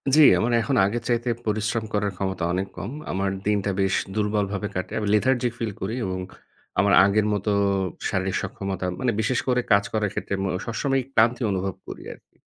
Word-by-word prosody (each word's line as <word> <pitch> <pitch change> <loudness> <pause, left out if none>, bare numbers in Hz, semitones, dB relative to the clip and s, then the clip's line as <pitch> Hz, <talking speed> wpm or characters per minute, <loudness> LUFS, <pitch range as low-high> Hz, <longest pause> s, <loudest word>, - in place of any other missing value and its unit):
জ্বী, 155 - +8 0.2
আমার 120 - +1
এখন 135 +4 0
আগের 115 +4 -2
চাইতে 120 0 0 0.2
পরিশ্রম 110 +1 0
করার 105 -1 +1
ক্ষমতা 95 -2 -2
অনেক 95 +2 -1
কম। - - -5 0.2
আমার 95 +1 0 0.2
দিনটা 105 -1 +1
বেশ 95 0 +2 0.2
দুর্বলভাবে 105 -1 0
কাটে। 90 - -3
আমি 105 - -2
lethargic 125 +2 +2
feel 115 -2 -1
করি 100 +5 -2
এবং 95 -1 -3 0.6
আমার 100 0 +4
আগের 105 +1 +2
মতো 105 +1 0 0.6
শারীরিক 95 -2 -1
সক্ষমতা 95 -1 -4
মানে 125 - +1
বিশেষ 120 +3 +1
করে 125 -1 +3
কাজ 100 -1 +6
করার 105 -2 +1
ক্ষেত্রে - - -4
মো - - 0 0.2
সবসময়ই 135 +3 0
ক্লান্তি 120 +2 +3
অনুভব 95 -1 -2
করি - - -8
আরকি। - - -23
105 Hz, 180 wpm, -24 LUFS, 100-115 Hz, 0.6 s, জ্বী